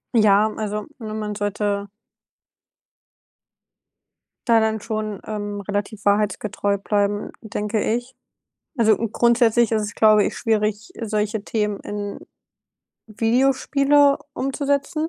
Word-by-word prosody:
Ja, 215 Hz, -1 st, +5 dB
also, 210 Hz, -1 st, -3 dB
ne, 215 Hz, -2 st, -6 dB
man 210 Hz, -1 st, -4 dB
sollte 205 Hz, 0 st, -2 dB, 2.6 s
da 230 Hz, -1 st, +5 dB
dann 220 Hz, 0 st, 0 dB
schon, 215 Hz, -2 st, -4 dB
ähm, 205 Hz, -1 st, -4 dB
relativ 205 Hz, +1 st, -4 dB
wahrheitsgetreu 205 Hz, 0 st, +1 dB
bleiben, 205 Hz, 0 st, -1 dB
denke 210 Hz, 0 st, -2 dB
ich. 245 Hz, +3 st, -2 dB, 0.6 s
Also 220 Hz, -4 st, +4 dB
grundsätzlich 235 Hz, 0 st, +2 dB
ist 220 Hz, -, +2 dB
es, 210 Hz, 0 st, -4 dB
glaube 215 Hz, -1 st, +5 dB
ich, -, -, -3 dB
schwierig, 215 Hz, -1 st, -1 dB
solche 215 Hz, -1 st, -1 dB
Themen 210 Hz, -2 st, -2 dB
in 205 Hz, -1 st, -5 dB, 0.9 s
Videospiele 275 Hz, +5 st, +3 dB, 0.2 s
umzusetzen 285 Hz, +4 st, -1 dB
215 Hz, 105 wpm, -22 LUFS, 205-230 Hz, 2.6 s, Ja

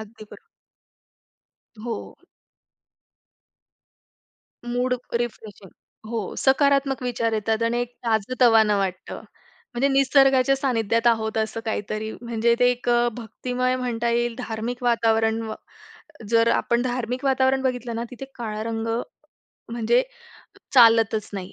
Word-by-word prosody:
अगदी 220 Hz, 0 st, -11 dB
बरोबर. 450 Hz, -, -16 dB, 1.4 s
हो. 235 Hz, -, -3 dB, 2.7 s
मूड 250 Hz, +1 st, 0 dB, 0.3 s
रिफ्रेशिंग 215 Hz, -5 st, -7 dB, 0.4 s
हो, 225 Hz, -4 st, -4 dB
सकारात्मक 275 Hz, 0 st, +2 dB
विचार 235 Hz, -2 st, -1 dB
येतात. 220 Hz, +1 st, -1 dB
आणि 235 Hz, +1 st, 0 dB
एक 245 Hz, 0 st, -4 dB
ताजं-तवानं 225 Hz, -1 st, +3 dB
वाटतं 185 Hz, -2 st, -4 dB, 0.6 s
म्हणजे 270 Hz, +4 st, +2 dB
निसर्गाच्या 270 Hz, -1 st, +4 dB
सान्निध्यात 230 Hz, -3 st, 0 dB
आहोत 220 Hz, -1 st, +2 dB
असं 220 Hz, +1 st, -2 dB
काहीतरी. 215 Hz, 0 st, -3 dB
म्हणजे, 235 Hz, 0 st, +1 dB
ते 245 Hz, 0 st, +4 dB
एक 245 Hz, 0 st, -4 dB
अ, 240 Hz, 0 st, +3 dB
भक्तिमय 250 Hz, +2 st, -2 dB
म्हणता 240 Hz, -2 st, -2 dB
येईल, 240 Hz, 0 st, 0 dB
धार्मिक 235 Hz, +1 st, -5 dB
वातावरण. 225 Hz, -1 st, +2 dB
व 220 Hz, -1 st, -5 dB, 0.8 s
जर 230 Hz, 0 st, +4 dB
आपण 235 Hz, 0 st, +1 dB
धार्मिक 250 Hz, +1 st, -3 dB
वातावरण 265 Hz, 0 st, +2 dB
बघितलं 245 Hz, -3 st, -2 dB
ना, 230 Hz, -, -3 dB
तिथे 250 Hz, +2 st, -8 dB
काळा 215 Hz, -2 st, -5 dB
रंग 225 Hz, 0 st, -3 dB, 0.9 s
म्हणजे 240 Hz, -, +2 dB, 0.7 s
चालतच 225 Hz, -3 st, +5 dB
नाही. 190 Hz, -2 st, -6 dB
235 Hz, 115 wpm, -23 LUFS, 220-250 Hz, 2.7 s, चालतच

